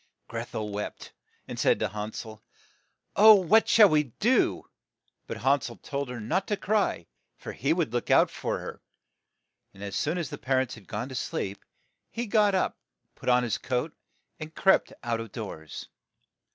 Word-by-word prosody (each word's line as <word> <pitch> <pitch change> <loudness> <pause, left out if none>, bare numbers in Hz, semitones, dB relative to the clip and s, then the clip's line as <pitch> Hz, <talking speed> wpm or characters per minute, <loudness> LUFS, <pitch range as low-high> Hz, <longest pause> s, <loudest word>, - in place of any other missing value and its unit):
Greth - - -6
el 105 -1 -2
wept, 105 0 -6 0.3
and - - -6
said - - +3
to 110 - 0
Han 105 +2 -5
sel, 110 -1 -8 0.7
"Oh, 215 +1 +9
what 205 +4 +4
shall 215 -2 +8
we 150 -2 +3
do?" 240 +3 +2 0.6
But - - -5
Han 140 +1 +4
sel - - -6
told 140 -2 -5
her 125 -1 -5
not 170 - -1
to 210 - 0
cry, 200 - 0 0.3
for - - -7
he 140 +5 -1
would 160 -8 0
look 120 - -2
out - - +5
for - - -3
her. - - -8 0.9
And 100 - -10
as 100 -1 -5
soon 155 +9 0
as 170 -5 -3
their - - -6
par 130 0 +1
ents 130 -2 -4
had 105 -6 -13
gone 110 +7 -4
to - - -8
sleep, 100 -5 -4 0.5
he 235 - -4
got 210 -2 +3
up, 185 - 0 0.3
put - - -4
on 125 0 +4
his 120 - -1
coat, 130 +5 -2 0.4
and 155 0 -8
crept 190 - +3
out 120 -1 -1
of 115 -2 -7
doors. 80 -8 -7
130 Hz, 185 wpm, -27 LUFS, -, 0.9 s, Oh